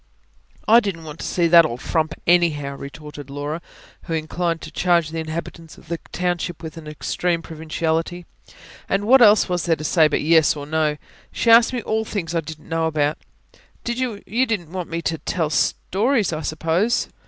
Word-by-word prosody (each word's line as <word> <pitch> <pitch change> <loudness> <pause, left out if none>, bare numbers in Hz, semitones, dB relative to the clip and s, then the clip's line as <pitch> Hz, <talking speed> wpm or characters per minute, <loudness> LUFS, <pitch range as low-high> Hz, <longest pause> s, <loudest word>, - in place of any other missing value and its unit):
"I 230 +2 +8
didn't 195 -7 -4
want 155 0 -9
to - - -4
see 175 - +1
that 170 0 +8
old 125 -6 -3
frump 160 +2 -1
anyhow," 155 -5 +2
retorted 145 0 -9
Laura, 145 +4 -4 0.4
who 165 - -4
inclined 165 +1 -2
to 155 - -9
charge 170 -2 +2
the 165 +1 -4
inhabitants 160 0 -6
of - - -18
the 170 -1 -3
township 175 -1 -2
with 160 -1 -7
an 160 -2 -10
extreme 165 +2 -2
provinciality. 160 +2 -3 0.6
"And 195 +1 0
what 260 +4 +6
else 210 -2 +6
was 180 -2 -1
there 165 -2 +3
to 155 - -8
say, 155 0 +4
but 150 - -1
yes 160 0 +4
or 145 -1 -6
no? 155 0 0 0.3
She 230 - +2
asked 230 0 +7
me 245 -3 -3
all 220 0 0
things 185 -6 -4
I 165 - +1
didn't 160 0 -10
know 165 0 0
anything 150 -2 +1
about. - - -25 1.1
You 245 +5 +1
don't 195 -8 -2
want 180 -2 -5
me 165 0 -3
to 160 -1 -1
tell 160 -4 -2
stories, 200 - +1
I 155 - -3
suppose?" 165 +9 0
165 Hz, 190 wpm, -22 LUFS, 155-180 Hz, 1.1 s, I